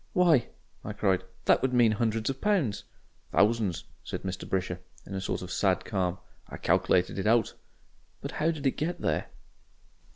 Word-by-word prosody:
"Why!" 170 -9 +4 0.4
I 105 - -5
cried, 95 -3 +1 0.2
"that - - +5
would 130 -1 0
mean 120 -3 +5
hundreds 110 0 0
of 135 - -9
pounds." 185 - +1 0.5
"Thousands," 105 -5 +2 0.2
said - - -5
Mr. 95 -1 -5
Brisher, 90 -2 -1 0.3
in - - -8
a 95 - -2
sort 95 - -2
of 90 - -7
sad 95 -2 +1
calm. 95 -3 -1 0.3
"I - - -8
calc'lated 90 +2 +2
it 95 - -1
out." 115 -1 +3 0.7
"But - - -5
how 160 - +1
did 155 -4 -3
they 135 - +3
get 170 +6 -3
there?" - - 0
110 Hz, 170 wpm, -29 LUFS, 95-135 Hz, 0.7 s, that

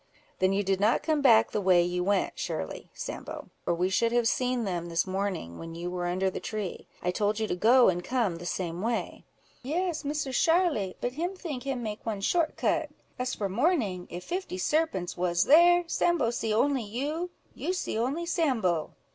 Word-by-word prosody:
"Then 185 0 +3
you 200 +1 +1
did 190 -1 0
not 215 +4 +3
come 305 -1 +1
back 115 - +5
the 210 - -1
way 185 -2 +5
you 180 0 -1
went 200 +1 +1
surely, - - -5
Sambo, - - -7 0.2
or 170 - +2
we 180 +2 0
should 230 +5 +2
have 240 -1 +2
seen 250 0 +1
them 175 -4 -3
this 165 0 +1
morning, 190 - -3
when 165 0 -7
you 175 +1 -4
were 175 -1 -2
under 185 +2 0
the - - -4
tree. 210 -4 -5 0.2
I 180 - +1
told 205 +3 0
you 220 - +1
to 195 - -2
go 240 +7 +6
and 175 -1 +1
come 225 -7 0
the 175 +1 -7
same 175 -1 -3
way." 230 +2 -2 0.4
"Yes, 325 +5 -2
Misser 290 -1 -2
Sharly, 325 - +2
but 245 - -1
him 350 +7 -3
think 310 -9 -5
him 265 -3 -2
make 215 -1 -5
one 215 -3 -3
short 325 - +1
cut. - - 0 0.3
As 250 0 -1
for 200 - -2
morning, 205 - 0
if 175 +1 -6
fifty 360 - -4
serpents 245 - 0
was 175 0 +1
there, 350 +3 +6
Sambo 335 -7 +1
see 225 -2 -2
only 265 +5 +2
you—you 295 - -4
see 370 - -2
only 265 +10 -1
Sambo." 240 - 0
220 Hz, 195 wpm, -28 LUFS, 185-290 Hz, 0.4 s, go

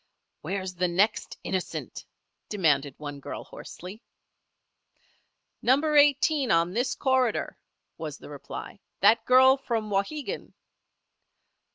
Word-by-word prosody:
"Where's 190 +3 -4
the 180 0 0
next 195 +5 0
innocent?" 185 -2 -4 0.4
demanded 145 -8 +1
one 145 -1 -7
girl, - - -7
hoarsely. 190 +6 -10 1.6
"Number 290 +5 +2
Eighteen, 290 -1 +4
on 170 0 +2
this 245 +4 0
corridor," 260 -4 +1 0.4
was - - -5
the - - -12
reply. - - -8 0.2
"That 220 +3 +5
girl 260 +1 +6
from 225 -5 -3
Wauhegan." 225 +9 -3
215 Hz, 100 wpm, -27 LUFS, 180-260 Hz, 1.6 s, girl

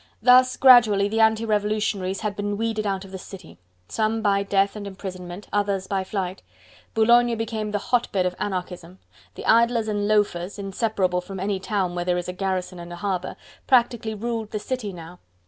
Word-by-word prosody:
Thus 255 +1 +6
gradually 230 -6 +6
the 220 +2 -1
anti 220 0 +3
revolutionaries 210 -2 -1
had 210 -2 -2
been 205 0 -3
weeded 220 -1 -1
out 195 -1 -2
of 190 - -13
the 190 - -7
city: 180 - -12 0.3
some 220 0 -1
by 200 -1 +2
death 200 0 +1
and 205 -1 -6
imprisonment, 185 -1 -8
others 200 -2 0
by 195 -1 -1
flight. 190 -1 -4 0.5
Boulogne 235 +1 +4
became 220 -1 -3
the 210 - -1
hotbed 205 -4 0
of 180 0 -1
anarchism: 180 -2 -5 0.4
the - - -8
idlers 230 0 +3
and 205 -1 -1
loafers, 205 -3 0
inseparable 195 -2 -1
from 190 +1 -8
any 195 0 -1
town 190 -3 -1
where 175 0 -2
there 180 0 +1
is 175 - -4
a 180 - -4
garrison 185 -1 -3
and 170 0 -9
a - - -6
harbour, 185 -1 -3 0.3
practically 235 -4 +2
ruled 225 0 -3
the 215 - -3
city 220 -1 -4
now. 175 0 -11
205 Hz, 180 wpm, -24 LUFS, 185-220 Hz, 0.5 s, Thus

